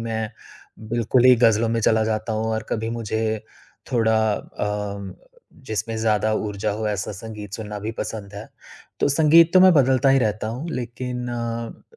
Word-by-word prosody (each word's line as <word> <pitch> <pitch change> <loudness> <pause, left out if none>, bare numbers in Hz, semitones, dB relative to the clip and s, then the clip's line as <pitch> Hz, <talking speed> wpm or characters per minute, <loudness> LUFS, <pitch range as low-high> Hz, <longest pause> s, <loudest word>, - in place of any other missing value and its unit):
मैं 110 -1 -3 0.6
बिल्कुल 120 +2 +2
ही 130 - +8
गज़लों 115 -1 +3
में 115 0 0
चला 110 +1 +3
जाता 110 +1 -2
हूँ 110 +1 -1
और 110 - -2
कभी 110 0 -2
मुझे 110 -1 -2 0.5
थोड़ा 110 -2 +3 0.2
अ, 105 -2 -5 0.5
जिसमें 110 +1 -3
ज़्यादा 110 -1 +1
ऊर्जा 105 -2 -2
हो 110 +1 -3
ऐसा 105 0 -3
संगीत 105 0 -8
सुनना 105 -1 -6
भी 110 - -3
पसंद 105 -3 -6
है। 105 +2 -8 0.5
तो - - +3
संगीत 160 +3 +5
तो 185 - +8
मैं 185 0 +8
बदलता 135 -1 +4
ही 135 0 +5
रहता 110 -2 -1
हूँ, 130 +9 -5
लेकिन 125 -1 -4
अ, 115 -1 -5
110 Hz, 165 wpm, -22 LUFS, 105-120 Hz, 0.6 s, ही